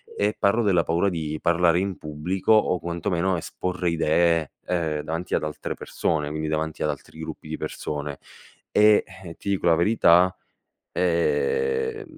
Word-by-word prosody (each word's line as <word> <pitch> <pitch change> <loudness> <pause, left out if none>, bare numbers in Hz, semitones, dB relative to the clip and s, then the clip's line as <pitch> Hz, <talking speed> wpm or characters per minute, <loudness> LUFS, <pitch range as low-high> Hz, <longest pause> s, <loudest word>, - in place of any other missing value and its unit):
e 105 +1 0
parlo 100 +4 +2
della 95 -6 +3
paura 85 +5 +1
di 80 -3 -4
parlare 85 0 +3
in 95 -1 -2
pubblico 75 +7 -2
o 105 -4 +3
quantomeno 85 +2 -1
esporre 90 +1 -3
idee, 85 -1 +2 0.2
ehm, 80 -4 -1
davanti 80 +4 -4
ad - - +1
altre 75 0 -4
persone, 75 -3 -2
quindi 80 +1 -3
davanti 80 0 -2
ad - - +1
altri - - -7
gruppi 80 -1 -8
di 80 - -4
persone. 75 -2 -5 0.5
E, 105 0 +5 0.2
eh, 85 - -7
ti 100 - -6
dico 100 - 0
la 85 -1 +5
verità, 90 -1 +4 0.6
ehm, 455 - 0
85 Hz, 155 wpm, -24 LUFS, 80-95 Hz, 0.6 s, E